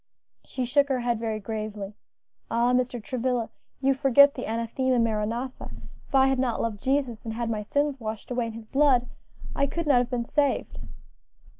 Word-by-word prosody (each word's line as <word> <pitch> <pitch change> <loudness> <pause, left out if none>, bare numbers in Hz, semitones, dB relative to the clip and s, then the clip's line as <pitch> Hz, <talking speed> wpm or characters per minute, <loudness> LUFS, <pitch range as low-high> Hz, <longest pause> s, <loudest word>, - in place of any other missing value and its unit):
She 255 - -3
shook 280 +3 +2
her 260 -2 0
head 240 -2 0
very 220 -1 -2
gravely. 215 -1 -5 0.6
"Ah! 235 +2 +2
Mr. 250 -1 0
Travilla, 250 -2 -1 0.3
you 270 0 +3
forget 280 +1 +6
the 250 - -5
anathema, 230 +3 0
maranatha; 230 +3 -1 0.4
if - - -5
I 265 0 +6
had 270 -1 +2
not 250 -3 0
loved 215 -3 -2
Jesus, 265 -4 0
and 225 -1 -5
had 235 0 -2
my 215 -1 -2
sins 285 +5 -1
washed 220 +1 -6
away 245 -2 0
in 225 - -6
His 225 0 -9
blood, 265 -1 +3 0.5
I 280 - +2
could 335 +4 -3
not 275 -5 +5
have 245 0 -1
been 245 -2 -2
saved." 285 +2 0
245 Hz, 180 wpm, -26 LUFS, 225-265 Hz, 0.6 s, forget